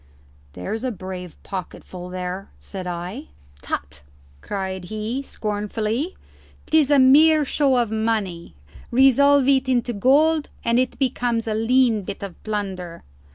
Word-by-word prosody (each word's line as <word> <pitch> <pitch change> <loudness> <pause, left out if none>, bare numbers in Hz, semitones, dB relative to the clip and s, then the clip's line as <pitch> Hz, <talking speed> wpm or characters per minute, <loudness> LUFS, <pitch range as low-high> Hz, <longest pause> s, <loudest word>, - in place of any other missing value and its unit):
"There's 155 - -5
a 260 - 0
brave 185 -5 -7
pocketful 180 -1 -7
there," 185 +1 -5
said 185 -2 -7
I. 180 - -5 0.3
"Tut!" 70 +1 -5 0.4
cried 190 -2 -4
he, 215 +6 -3
scornfully. 215 - -3 0.5
"'Tis 310 -3 +3
a 290 - +5
mere 300 +4 +6
show 275 -1 +2
of 235 -3 +1
money; 215 - -2 0.3
resolve 270 +2 +5
it 265 -1 +3
into 245 -1 +1
gold 295 +8 +3 0.2
and 235 +1 +3
it 255 -1 -1
becomes 245 -3 0
a 220 - 0
lean 230 0 +3
bit 195 +1 -7
of 195 -3 -8
plunder. 190 -5 -4
220 Hz, 130 wpm, -22 LUFS, 190-260 Hz, 0.5 s, mere